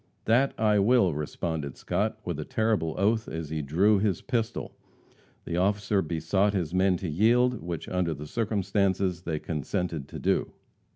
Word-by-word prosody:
"That 125 +5 +3
I 105 -2 +3
will!" 100 -4 +4
responded 75 -1 -4
Scott, - - -1
with - - -3
a - - -2
terrible 110 -8 0
oath 110 +3 +1
as 80 -2 -5
he 80 -1 -1
drew 95 +9 +3
his 100 -4 0
pistol. 115 -2 -2 0.7
The 85 - -2
officer 100 +1 +1
besought 85 +5 0
his 85 -3 -2
men 95 0 +3
to 95 - -5
yield, 120 +8 +3
which 85 -1 -5
under 90 -3 -1
the 75 +2 -8
circumstances 100 -2 0
they 80 -3 -2
consented 80 0 -3
to - - -8
do. - - 0
95 Hz, 160 wpm, -27 LUFS, 80-105 Hz, 0.7 s, will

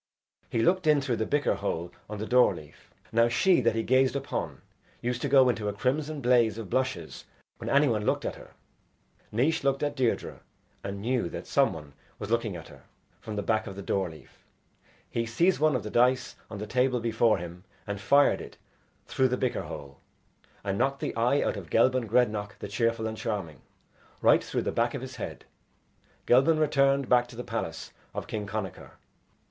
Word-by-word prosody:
He 115 - 0
looked 180 -1 +2
in 150 -1 +5
through 130 -4 -1
the 110 - -1
bicker 145 0 +1
hole 85 +1 -3 0.2
on 105 - -5
the 105 - -4
door 125 -5 +4
leaf. 75 -3 -14 0.2
Now 115 +1 +4
she 130 +7 +3
that 115 -2 +2
he 115 - 0
gazed 130 +2 +3
upon 140 -1 -4 0.4
used 120 0 -2
to 140 - -1
go 135 -1 +6
into 115 -4 0
a 105 - -1
crimson 145 +7 -1
blaze 120 -3 +3
of 110 -5 -7
blushes 130 -11 -2 0.3
when - - -5
any 140 +1 +4
one 110 -4 0
looked - - 0
at - - -2
her. - - -14 0.8
Naois 135 +9 +1
looked 135 +1 +1
at 145 - -1
Deirdre 130 -4 -1 0.4
and 100 0 -5
knew 120 -6 0
that - - -7
some - - +3
one 75 -3 -9 0.2
was - - -6
looking - - 0
at - - -9
her - - -15 0.4
from 110 - -7
the 105 - -2
back 110 +1 0
of 95 - -7
the 100 - -7
door 95 -2 0
leaf. 80 -1 -16 0.6
He 115 0 -2
seized 170 +11 +2
one 155 -2 +3
of 120 - -1
the 105 - -6
dice 125 +2 +2
on 110 - -7
the 105 - -5
table 125 +3 +1
before 115 -1 +2
him 85 0 -8 0.2
and 100 -1 -5
fired 140 +7 +4
it - - -11 0.5
through 130 - +2
the 125 0 -1
bicker 125 -1 -1
hole, 70 -2 -9 0.6
and 100 -1 -2
knocked 135 +2 0
the - - -3
eye 120 +5 +2
out - - -1
of 90 -5 -8
Gelban 125 +3 +3
Grednach 105 -3 +1
the - - -6
Cheerful 115 +2 0
and 110 0 -3
Charming, 95 - -4 0.6
right - - +5
through - - -2
the - - -1
back 120 +4 0
of 135 - -5
his 130 -2 -8
head. 110 - -6 0.8
Gelban 135 +6 +5
returned 140 -3 +2
back 125 0 +4
to 120 - -13
the 125 - -5
palace 115 -9 -5 0.2
of - - -3
King 105 -2 -4
Connachar. 100 -3 -5
120 Hz, 200 wpm, -28 LUFS, 105-130 Hz, 0.8 s, go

